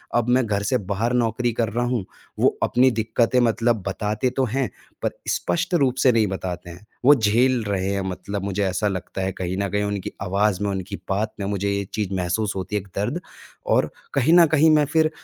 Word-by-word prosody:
अब 120 0 +2
मैं 125 0 +3
घर 100 -1 -1
से 130 - +4 0.2
बाहर 115 +5 0
नौकरी 120 0 +1
कर 115 -1 0
रहा 120 +3 -1
हूँ, 120 -6 -1 0.3
वो - - +3
अपनी 130 +2 +4
दिक्कतें 115 +2 +1
मतलब 115 -2 +2
बताते 105 +5 -1
तो 130 - +3
हैं, 130 +3 -1 0.3
पर - - 0 0.2
स्पष्ट 180 +1 -1
रूप 135 -6 +2
से 130 - +6
नहीं 110 -3 +2
बताते 90 -2 -5
हैं, 90 +5 -12 0.2
वो 145 - +9
झेल 120 +2 +2
रहे 100 -2 -1
हैं 100 - -1
मतलब 95 +2 -5
मुझे 100 0 -1
ऐसा 95 +3 0
लगता 95 0 -4
है 95 0 -1
कहीं 95 0 -3
न 100 0 0
कहीं 105 +2 0
उनकी 100 -2 -3
आवाज़ 100 +1 +1
में, 100 - 0
उनकी 95 +1 -4
बात 105 +3 -1
में 100 - -2
मुझे 100 0 -1
ये 100 0 -1
चीज 105 -3 -2
महसूस 90 +4 -1
होती 95 +2 -4
है 105 - +1
एक 100 - -16
दर्द 125 - -1 0.5
और - - +2 0.2
कहीं 140 +3 +3
न 175 -1 +8
कहीं 160 +1 +4
मैं 150 -1 +4
फिर 155 +2 +2
105 Hz, 215 wpm, -23 LUFS, 100-125 Hz, 0.5 s, वो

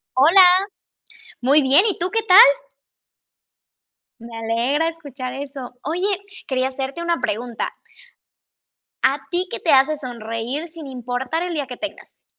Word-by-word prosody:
Hola. 335 +9 +7 1.0
Muy 275 +5 +4
bien, 275 +8 +5
¿y 400 - -1
tú 355 +2 -1
qué 450 +1 +1
tal? 380 -3 +6 1.8
Me 230 0 -10
alegra 235 +8 0
escuchar 285 -6 -7
eso. 270 -3 -8
Oye, 340 +7 -1 0.4
quería 260 -1 0
hacerte 270 +5 -5
una 340 -1 -1
pregunta. 235 +2 -3 1.3
¿A 270 +2 +2
ti 360 +1 0
qué - - -5
te 330 - 0
hace 275 +3 +4
sonreír 240 +2 -5
sin 325 -3 -11
importar 250 +5 -4
el 355 -1 -4
día 290 -4 -3
que 250 - -7
tengas? 310 +3 -9
275 Hz, 135 wpm, -21 LUFS, 250-330 Hz, 1.8 s, Hola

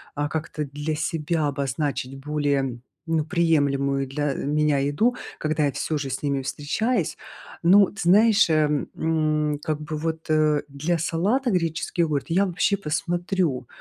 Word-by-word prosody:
а, 145 0 -1
как-то 155 -1 -3
для 145 +2 -4
себя 160 0 -1
обозначить 140 -1 -2
более, 140 -3 -1 0.3
ну, 160 -2 +1
приемлемую 140 -5 +1
для, 145 +1 -1
э, - - -4
меня 150 0 +2
еду, 145 - +1 0.2
когда 155 0 0
я 140 - +1
всё 155 +4 -2
же 140 -2 -4
с 130 - -4
ними 140 -2 0
встречаюсь. 160 - -1 0.5
Но, 195 +4 +7
ты 200 - -8
знаешь, 205 +3 +5
э, 155 -2 +3 0.3
м, 155 -2 0
как 155 -1 -2
бы 150 0 -4
вот, 160 +1 -4
э, 155 -1 +3
для 150 +5 -1
салата 200 - 0
греческий 165 -1 -1
йогурт 150 -4 -1
я 185 +4 +3
вообще 185 +2 +1
посмотрю, 175 -5 -1
155 Hz, 150 wpm, -24 LUFS, 145-170 Hz, 0.5 s, Но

